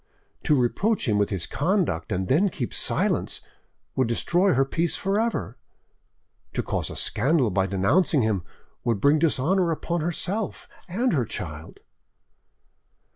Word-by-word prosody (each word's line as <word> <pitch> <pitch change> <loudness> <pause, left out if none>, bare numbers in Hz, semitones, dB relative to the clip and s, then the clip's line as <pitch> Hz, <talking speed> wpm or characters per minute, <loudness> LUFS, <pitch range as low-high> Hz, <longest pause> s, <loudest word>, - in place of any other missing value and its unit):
To 150 - +4
reproach 195 - +1
him 105 -2 +2
with 100 - +2
his 95 -5 -1
conduct 150 - 0
and 95 -1 -1
then 180 +9 +3
keep 125 -9 -4
silence - - 0 0.6
would 130 -2 +2
destroy 175 +10 +2
her 135 +1 +3
peace 165 +5 0
for 195 +2 0
ever; 225 - -2 0.9
to - - -1
cause - - -2
a - - -7
scandal 130 0 +2
by 95 +1 +1
denouncing 130 - +2
him 105 -4 +1 0.4
would 115 -4 0
bring 145 +7 +4
dishonour 170 +4 +2
upon 170 +1 -2
herself 185 +5 -3 0.2
and 235 +7 +1
her 135 -6 +2
child. 80 -5 -7
145 Hz, 140 wpm, -25 LUFS, -, 0.9 s, To